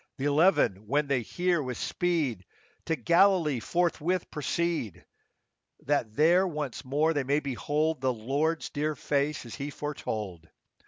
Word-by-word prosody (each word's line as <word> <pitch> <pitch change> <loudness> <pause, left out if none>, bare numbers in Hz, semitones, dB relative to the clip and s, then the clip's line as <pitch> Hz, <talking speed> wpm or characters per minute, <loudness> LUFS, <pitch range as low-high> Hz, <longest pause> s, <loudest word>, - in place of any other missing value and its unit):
Th' - - -9
eleven, 145 - +3
when 145 +5 +2
they 140 -3 +1
hear, 175 +6 0
with 130 -4 -4
speed 155 - -1 0.4
To 160 - 0
Galilee 170 -5 +3
forthwith 175 +4 0
proceed, 150 - -2 0.8
That 125 -6 -1
there 175 +5 +4
once 150 -7 -4
more 150 +5 +1
they 145 -3 0
may 140 +3 +1
behold 145 +3 -1
The 130 -1 +2
Lord's 140 +8 -1
dear 150 +1 -1
face 145 0 -1
as 115 - -9
He 140 +1 -5
foretold. 105 - -5
145 Hz, 140 wpm, -28 LUFS, 130-165 Hz, 0.8 s, there